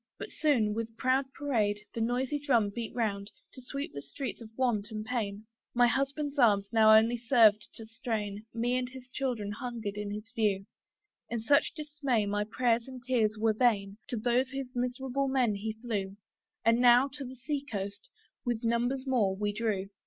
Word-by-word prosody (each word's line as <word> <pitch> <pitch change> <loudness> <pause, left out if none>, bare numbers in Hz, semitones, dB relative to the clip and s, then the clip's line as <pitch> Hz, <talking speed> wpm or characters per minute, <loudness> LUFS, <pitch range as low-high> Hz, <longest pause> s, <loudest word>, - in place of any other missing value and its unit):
But - - -7
soon, 240 -9 +2
with 225 0 -4
proud 265 +1 +1
parade, 225 -8 0
the 230 - -3
noisy 255 +5 0
drum 240 -8 +2
Beat 230 +2 -5
round, 205 -4 -1 0.2
to 260 - -11
sweep 275 +3 -5
the 140 - -5
streets 190 - -6
of 225 - -9
want 235 -5 +1
and 215 -1 -5
pain. 215 -3 -3 0.3
My 245 0 +6
husband's 275 +4 -1
arms 200 -5 +4
now 220 -1 +7
only 230 +2 +3
served 225 -3 +4
to 225 - -8
strain 215 -2 -4
Me 240 +2 0
and 250 -1 -2
his 255 -1 -11
children 245 -6 -2
hungering 225 -2 -4
in 210 0 -3
his 210 +3 -7
view: 210 -5 0 0.6
In 235 - -2
such 285 +8 +3
dismay 290 -7 -1
my 205 +1 0
prayers 230 +1 +1
and 255 -2 -9
tears 225 -5 +1
were 220 0 +2
vain: 210 -3 +1
To 240 - -3
join 240 +2 +1
those 265 +1 0 0.2
miserable 255 +2 -1
men 255 -5 +2
he 215 +2 -3
flew; 210 -4 -4 0.5
And 230 +1 +5
now 245 +2 +7
to 280 +1 -7
the 260 0 -8
sea 280 +3 -3
coast, 205 - -6 0.3
with 240 -2 -2
numbers 240 +3 0
more, 225 -8 +2
we 205 +1 -1
drew. 205 -3 -1
235 Hz, 180 wpm, -30 LUFS, 210-255 Hz, 0.6 s, now